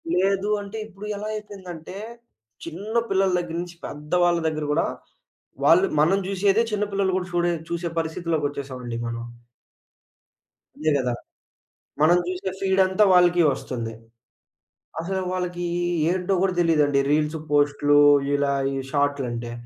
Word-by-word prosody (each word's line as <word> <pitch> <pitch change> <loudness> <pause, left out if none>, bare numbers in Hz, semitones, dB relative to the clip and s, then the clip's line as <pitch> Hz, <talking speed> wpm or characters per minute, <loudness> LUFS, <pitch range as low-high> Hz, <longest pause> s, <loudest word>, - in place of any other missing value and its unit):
లేదు 195 +2 +1
అంటే, 200 +2 -7
ఇప్పుడు 200 0 -11
ఎలా 210 - -5
అయిపోయిందంటే, 190 -4 -8 0.7
చిన్న 195 +7 -6
పిల్లల 190 -1 +2
దగ్గర 170 -1 -5
నుంచి 175 -1 -11
పెద్దవాళ్ళ 170 +4 +1
దగ్గర 155 -1 -2
గూడా 150 - +2 0.8
వాళ్ళు 175 +6 +6
మనం 175 +6 +4
జూశేదే 200 +3 +2
చిన్న 210 0 +1
పిల్లలు 195 -1 +1
గూడా 180 - -2
చూడే 175 0 +1 0.2
చూసే 170 0 -2
పరిస్థితిలోకొచ్చేసాం 150 -5 -2
అండి 120 -1 -4
మనం. 115 0 -4 1.5
అంతే 155 0 0
గదా! 125 -3 0 0.9
మనం 170 +3 +6
జూసే 185 +1 -3
ఫీడ్ 190 0 +1
అంతా 190 +3 +3
వాళ్ళకి 175 -1 +5
ఒస్తుంది. 115 -4 -5 1.1
అసలు 190 +3 -2
వాళ్ళకి 180 -1 -3 0.5
ఏంటో 185 +1 0
గూడా 190 -1 +2
తెలియదండి. 150 -5 +3
రీల్స్, 150 +1 +1
పోస్ట్‌‌‌‌లు 145 0 +3 0.4
ఇలా 140 0 +1 0.2
ఈ - - -3 0.2
షార్ట్‌‌‌‌‌‌‌‌‌‌‌లంటే. 135 -5 -1
175 Hz, 125 wpm, -24 LUFS, 145-190 Hz, 1.5 s, వాళ్ళు